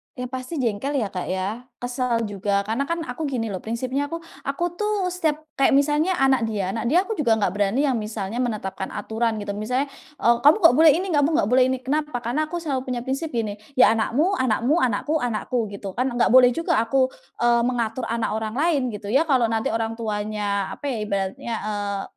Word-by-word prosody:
Ya 250 0 -6
pasti 255 +5 -5
jengkel 260 +1 -1
ya, 195 - -4
Kak, 180 - -4
ya 200 +7 -3
kesal 245 -1 -1
juga. 200 -1 -1
Karena 230 +7 -2
kan 335 0 -2
aku 320 -1 -4
gini 230 -5 -2
loh, 185 - -4
prinsipnya 255 +5 -2
aku 335 +2 -6 0.2
aku 340 +6 -1
tuh 420 -3 0
setiap 310 -4 -1 0.2
kayak 270 - +4
misalnya 300 +6 +2
anak 265 -5 +2
dia 200 -4 -2
anak 230 +2 -3
dia, 350 +8 +4
aku 435 -2 -5
juga 235 -6 +3
nggak 205 -4 0
berani 205 +7 +1
yang 265 -5 +1
misalnya 215 +1 -4
menetapkan 210 -6 -3
aturan 220 +2 -1
gitu. 205 - -4
Misalnya, 250 +7 -2 0.2
eee, 235 -3 +3
"Kamu 290 +5 +6
kok 330 - +9
boleh 315 +4 +7
ini, 370 +2 -2
kamu 295 +1 +2
nggak 200 - +2
boleh 255 0 +6
ini." 260 0 -2
kenapa? 300 +1 -1
Karena 280 +7 -1
aku 345 +1 -5
selalu 265 -4 -2
punya 245 -2 -2
prinsip 270 +5 -2
gini, 220 -7 -3 0.2
"Ya 255 -3 +6
anakmu 285 - +1
anakmu, 255 +6 +2
anakku, 255 +6 0
anakku." 240 -1 -1
gitu 200 -1 -7
kan. 250 +7 -1
Enggak 245 -2 +1
boleh 255 -1 +8
juga 330 -8 +1
aku, 260 +3 +2 0.3
eee, 240 0 +4
mengatur 235 -1 -2
anak 230 -1 -1
orang 220 0 -4
lain 285 -3 +1
gitu 205 0 -6
ya. 285 +7 +3
Kalau 250 -6 +3
nanti 220 -1 0
orang 225 0 -2
tuanya 210 -2 -2
apa 290 - -4
ya, 255 - -1
ibaratnya, 200 +3 -3
eee, 205 -2 -3
245 Hz, 205 wpm, -23 LUFS, 215-285 Hz, 0.3 s, kok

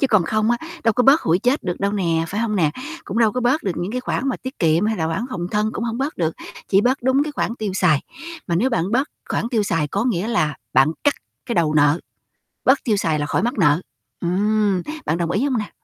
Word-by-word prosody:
Chứ 275 - +3
còn 215 -7 +4
không 215 +5 +1
á, 240 - +3 0.3
đâu 225 - +4
có 250 - +2
bớt 275 +5 +6
hụi 165 +2 +2
chết 250 +7 +1
được 175 -2 -3
đâu 200 +1 0
nè, 165 -5 0
phải 205 +5 -2
hông 215 -3 0
nè? 155 -5 +3 0.3
Cũng 215 - -3
đâu 225 -3 +4
có 250 - -1
bớt 250 +6 +2
được 190 - -1
những 175 +5 -3
cái 255 - -2
khoản 255 +1 -2
mà 255 - -1
tiết 260 +2 -8
kiệm 165 +4 +3
hay 220 0 0
là 160 -3 -1
khoản 165 +6 -2
phòng 175 -8 -3
thân 210 0 +1
cũng 230 - -3
hông 230 0 -3
bớt 275 +4 -2
được, 165 -2 -1 0.3
chỉ 195 - +4
bớt 250 +4 +1
đúng 260 +3 +3
cái 300 - -5
khoản 230 - -2
tiêu 210 -3 -2
xài. 170 -7 +3 0.4
Mà 170 - 0
nếu 240 +10 +2
bạn 195 -2 -1
bớt 265 +4 +1 0.2
khoản 230 - -1
tiêu 230 -4 +1
xài 165 -6 0
có 200 +8 -1
nghĩa 220 -3 0
là 155 -11 +1 0.2
bạn 145 +4 +4
cắt 290 - +4 0.3
cái 240 - -2
đầu 160 -4 +2
nợ, 150 +2 +4 0.6
bớt 265 +2 +5
tiêu 220 -5 +2
xài 160 -5 0
là 145 - -1
khỏi 170 - 0
mắc 240 +3 0
nợ, 150 -3 +4 0.4
ừm. 200 +1 +1 0.2
Bạn 160 - +1
đồng 170 -1 -1
ý 205 +9 +1
hông 265 -4 +1
nè? 210 - -4
210 Hz, 265 wpm, -21 LUFS, 170-240 Hz, 0.6 s, bớt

